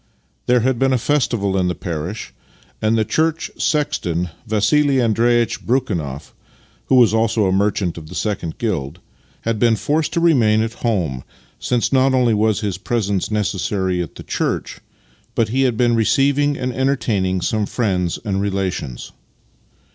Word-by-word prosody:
There 125 Hz, 0 st, +4 dB
had 130 Hz, 0 st, 0 dB
been 135 Hz, 0 st, +2 dB
a -, -, +3 dB
festival 110 Hz, -7 st, 0 dB
in 95 Hz, -2 st, +1 dB
the 90 Hz, -, -1 dB
parish, 85 Hz, +5 st, -5 dB, 0.5 s
and 110 Hz, +1 st, +2 dB
the 110 Hz, -, +1 dB
church 160 Hz, +6 st, 0 dB
sexton, 90 Hz, -, 0 dB, 0.2 s
Vassili 135 Hz, +6 st, +2 dB
Andreitch 120 Hz, 0 st, +2 dB
Brekhunoff, 85 Hz, -, -2 dB, 0.5 s
(who -, -, +3 dB
was 120 Hz, -4 st, +5 dB
also 110 Hz, -1 st, +2 dB
a 95 Hz, -, +2 dB
merchant 95 Hz, -3 st, 0 dB
of 75 Hz, -1 st, -12 dB
the -, -, -9 dB
second 95 Hz, -6 st, -3 dB
guild), 85 Hz, -, -3 dB, 0.4 s
had 115 Hz, -1 st, -2 dB
been 115 Hz, -1 st, +4 dB
forced 150 Hz, +7 st, 0 dB
to -, -, +1 dB
remain 115 Hz, -10 st, +3 dB
at 115 Hz, 0 st, -3 dB
home, 85 Hz, -, -1 dB, 0.4 s
since 125 Hz, +2 st, 0 dB
not 130 Hz, 0 st, +4 dB
only 125 Hz, -3 st, +3 dB
was 110 Hz, 0 st, +1 dB
his 100 Hz, -4 st, -3 dB
presence 100 Hz, -3 st, -1 dB
necessary 95 Hz, -3 st, -1 dB
at 85 Hz, -, -6 dB
the -, -, -9 dB
church, -, -, -2 dB, 0.6 s
but 115 Hz, -2 st, +1 dB
he 130 Hz, +4 st, 0 dB
had 115 Hz, -, -4 dB
been 120 Hz, 0 st, +3 dB
receiving 140 Hz, +5 st, +2 dB
and 125 Hz, -1 st, -3 dB
entertaining 115 Hz, -8 st, 0 dB
some 110 Hz, +5 st, -1 dB
of 105 Hz, -, -1 dB
his -, -, -14 dB
friends 90 Hz, -7 st, 0 dB
and 100 Hz, -2 st, -1 dB
relations. 95 Hz, -10 st, -3 dB
110 Hz, 160 wpm, -19 LUFS, 95-125 Hz, 0.6 s, was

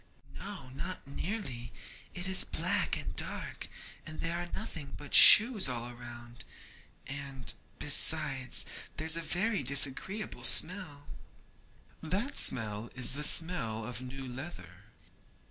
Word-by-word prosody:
'No, 185 Hz, -9 st, -9 dB
not 170 Hz, +8 st, -8 dB
nearly; 140 Hz, -, -6 dB, 0.4 s
it 180 Hz, 0 st, -5 dB
is 190 Hz, -1 st, +1 dB
black -, -, -2 dB
and -, -, -7 dB
dark, -, -, -2 dB, 0.4 s
and 155 Hz, 0 st, -10 dB
there 165 Hz, +1 st, -4 dB
are 175 Hz, 0 st, -7 dB
nothing 165 Hz, -10 st, -8 dB
but 145 Hz, -1 st, -11 dB
shoes 215 Hz, -, +8 dB
all 120 Hz, -1 st, -3 dB
round, 120 Hz, -1 st, -12 dB, 0.6 s
and, 140 Hz, -1 st, -4 dB, 0.2 s
besides, 130 Hz, -2 st, +3 dB, 0.3 s
there's 160 Hz, +1 st, +3 dB
a 165 Hz, -, -2 dB
very 185 Hz, +7 st, -2 dB
disagreeable 140 Hz, +10 st, 0 dB
smell.' 160 Hz, -5 st, +3 dB, 1.0 s
'That 195 Hz, -, -3 dB
smell 110 Hz, -1 st, 0 dB
is 130 Hz, 0 st, +1 dB
the 150 Hz, +2 st, -3 dB
smell 125 Hz, -11 st, +1 dB
of 125 Hz, -1 st, -5 dB
new 130 Hz, +1 st, -9 dB
leather.' 100 Hz, -, -10 dB
140 Hz, 120 wpm, -30 LUFS, 125-180 Hz, 1.0 s, shoes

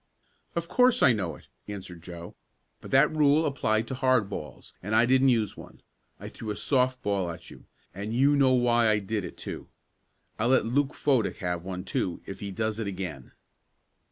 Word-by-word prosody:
"Of 170 Hz, 0 st, -2 dB
course 250 Hz, +4 st, +3 dB
I 125 Hz, -, +7 dB
know 95 Hz, -7 st, -3 dB
it," -, -, -17 dB, 0.2 s
answered 95 Hz, -4 st, -8 dB
Joe. 85 Hz, 0 st, -9 dB, 0.5 s
"But -, -, -10 dB
that 140 Hz, +4 st, +4 dB
rule 150 Hz, +1 st, +4 dB
applied 115 Hz, -6 st, 0 dB
to -, -, -4 dB
hard 130 Hz, -6 st, +2 dB
balls, 75 Hz, -6 st, -8 dB
and 105 Hz, +3 st, -2 dB
I 115 Hz, +2 st, +5 dB
didn't 130 Hz, +2 st, +4 dB
use 115 Hz, -4 st, +1 dB
one. -, -, -13 dB, 0.4 s
I -, -, -8 dB
threw 110 Hz, -, -8 dB
a 105 Hz, -, -2 dB
soft 130 Hz, 0 st, +1 dB
ball 100 Hz, -3 st, 0 dB
at 85 Hz, 0 st, -9 dB
you, -, -, -14 dB, 0.3 s
and 100 Hz, +4 st, -5 dB
you 135 Hz, +5 st, +3 dB
know 135 Hz, -2 st, +4 dB
why 120 Hz, -2 st, +3 dB
I 105 Hz, -, +3 dB
did 105 Hz, 0 st, -3 dB
it, -, -, -8 dB
too. -, -, -7 dB, 0.7 s
I'll 110 Hz, -, +1 dB
let 130 Hz, -3 st, +3 dB
Luke 135 Hz, +5 st, 0 dB
Fodick 130 Hz, -7 st, +1 dB
have 90 Hz, -2 st, -3 dB
one, 90 Hz, 0 st, -5 dB
too, 90 Hz, -2 st, -3 dB
if 95 Hz, -1 st, -8 dB
he 100 Hz, -, -5 dB
does 110 Hz, +2 st, -2 dB
it 110 Hz, -, -2 dB
again." 90 Hz, -9 st, -6 dB
110 Hz, 195 wpm, -27 LUFS, 95-130 Hz, 0.7 s, I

